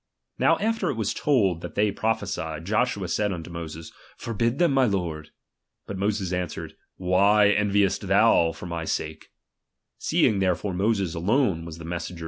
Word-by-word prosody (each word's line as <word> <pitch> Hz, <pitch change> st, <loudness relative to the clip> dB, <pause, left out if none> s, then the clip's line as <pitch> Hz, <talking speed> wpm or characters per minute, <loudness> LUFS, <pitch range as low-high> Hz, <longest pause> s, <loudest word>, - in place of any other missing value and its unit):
Now -, -, +4 dB
after 220 Hz, -4 st, 0 dB
it -, -, -1 dB
was 110 Hz, -2 st, -1 dB
told 100 Hz, -, +1 dB
that 85 Hz, -, -8 dB
they 105 Hz, 0 st, +2 dB
prophesied, 85 Hz, -7 st, -2 dB
Joshua 105 Hz, -1 st, 0 dB
said 105 Hz, +4 st, 0 dB
unto 85 Hz, -1 st, -6 dB
Moses, 80 Hz, -1 st, -7 dB, 0.3 s
Forbid 115 Hz, +2 st, -1 dB
them, 175 Hz, -2 st, +3 dB
my 135 Hz, -1 st, +4 dB
lord. 85 Hz, -8 st, -2 dB, 0.6 s
But 100 Hz, -1 st, -6 dB
Moses 100 Hz, -2 st, -1 dB
answered: 90 Hz, -3 st, -4 dB, 0.2 s
Why 100 Hz, +3 st, +4 dB
enviest 105 Hz, -1 st, +1 dB
thou 80 Hz, -1 st, +4 dB
for 80 Hz, -, -10 dB
my 85 Hz, -1 st, -4 dB
sake? 80 Hz, 0 st, -4 dB, 0.7 s
Seeing 100 Hz, -, +2 dB
therefore 95 Hz, +1 st, 0 dB
Moses 100 Hz, -2 st, 0 dB
alone 95 Hz, -, +1 dB
was 80 Hz, -1 st, -8 dB
the 85 Hz, -, -9 dB
messenger 85 Hz, +1 st, -4 dB
RELIGION. -, -, -11 dB
95 Hz, 160 wpm, -25 LUFS, 85-105 Hz, 0.7 s, Now